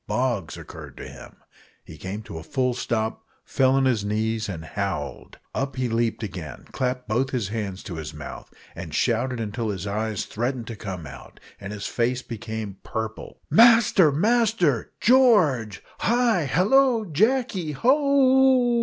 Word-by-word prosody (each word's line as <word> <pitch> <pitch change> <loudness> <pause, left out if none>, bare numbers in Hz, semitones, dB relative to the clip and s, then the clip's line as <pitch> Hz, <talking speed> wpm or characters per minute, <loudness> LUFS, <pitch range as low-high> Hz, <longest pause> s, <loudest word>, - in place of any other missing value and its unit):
Bogs 120 -9 -1
occurred - - -11
to - - -8
him - - -12 0.5
he 80 - -11
came 95 +7 -6
to 80 - -8
a - - -10
full 125 - 0
stop, 110 -2 -2 0.2
fell 130 0 +2
on 135 0 +3
his 120 -6 +1
knees, 110 +1 -1
and 80 -4 -6
howled. 90 -7 -4 0.2
Up 135 0 -2
he 130 -1 -1
leaped 115 0 -1
again, 80 -10 -7
clapped 125 0 -2
both 120 +5 0 0.2
hands 105 -4 -4
to 85 - -7
his 80 - -6
mouth, - - -9 0.2
and 80 -4 -7
shouted 120 +1 0
until 110 +1 -3
his 95 -2 -4
eyes 105 +1 -2
threatened 120 +2 -3
to 115 - -7
come 95 -6 -6
out, 65 - -12 0.2
and 100 0 -7
his 105 -1 -6
face 125 +2 -1
became 110 -3 -6
purple, 110 0 -6
"Master! 225 -8 +6
Master! 200 - +1
George! 180 - +3 0.2
hi! 235 -8 +2
hallo 225 - +3
o! - - -7
Jacky! 195 - 0
ho 190 - +3
o 285 - +5
o!" 265 -3 +4
120 Hz, 160 wpm, -24 LUFS, -, 0.5 s, Master